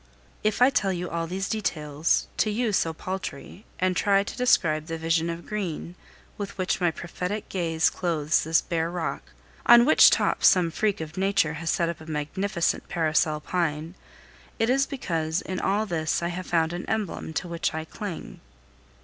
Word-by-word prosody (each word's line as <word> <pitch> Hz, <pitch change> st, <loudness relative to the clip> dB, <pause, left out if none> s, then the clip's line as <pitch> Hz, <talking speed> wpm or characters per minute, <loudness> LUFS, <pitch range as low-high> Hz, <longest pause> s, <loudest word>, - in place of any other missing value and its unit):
If 215 Hz, +3 st, +2 dB
I 260 Hz, -, +6 dB
tell 200 Hz, -7 st, +1 dB
you 180 Hz, -1 st, -4 dB
all 165 Hz, 0 st, -2 dB
these 190 Hz, +3 st, -3 dB
details, 155 Hz, -7 st, 0 dB
to 215 Hz, -, +2 dB
you 220 Hz, +1 st, 0 dB
so 165 Hz, -3 st, +2 dB
paltry, 185 Hz, +1 st, -6 dB
and 185 Hz, 0 st, +1 dB
try 200 Hz, +1 st, +3 dB
to -, -, -7 dB
describe 160 Hz, -11 st, +2 dB
the 165 Hz, -1 st, -3 dB
vision 165 Hz, +1 st, +1 dB
of 170 Hz, +1 st, -5 dB
green 185 Hz, -5 st, -4 dB, 0.5 s
with 200 Hz, -1 st, -5 dB
which 185 Hz, 0 st, -1 dB
my 175 Hz, -, +4 dB
prophetic 180 Hz, +5 st, -5 dB
gaze 165 Hz, -3 st, +1 dB
clothes 155 Hz, -4 st, 0 dB
this 160 Hz, +1 st, +3 dB
bare 165 Hz, -1 st, -1 dB
rock 175 Hz, -2 st, -3 dB, 0.4 s
on 240 Hz, 0 st, +8 dB
which 310 Hz, -, +8 dB
top -, -, +1 dB
some 175 Hz, -3 st, +5 dB
freak 205 Hz, +1 st, 0 dB
of 155 Hz, +2 st, -7 dB
nature 195 Hz, -4 st, +2 dB
has 165 Hz, -, -2 dB
set 170 Hz, -, +1 dB
up 170 Hz, -1 st, -5 dB
a 160 Hz, -, -12 dB
magnificent 170 Hz, +5 st, -1 dB
parasol 155 Hz, -2 st, +1 dB
pine 160 Hz, -1 st, -2 dB, 0.6 s
it 225 Hz, +2 st, +2 dB
is 275 Hz, +1 st, +2 dB
because 165 Hz, -, -2 dB
in 185 Hz, 0 st, -4 dB
all 205 Hz, +3 st, +1 dB
this 165 Hz, -3 st, -1 dB
I 170 Hz, -, 0 dB
have 180 Hz, +1 st, -5 dB
found 165 Hz, -1 st, +1 dB
an 175 Hz, -, -5 dB
emblem 210 Hz, -7 st, -2 dB
to 160 Hz, -, -2 dB
which 170 Hz, 0 st, -1 dB
I 160 Hz, 0 st, -3 dB
cling. 195 Hz, +1 st, -7 dB
175 Hz, 180 wpm, -26 LUFS, 160-200 Hz, 0.6 s, on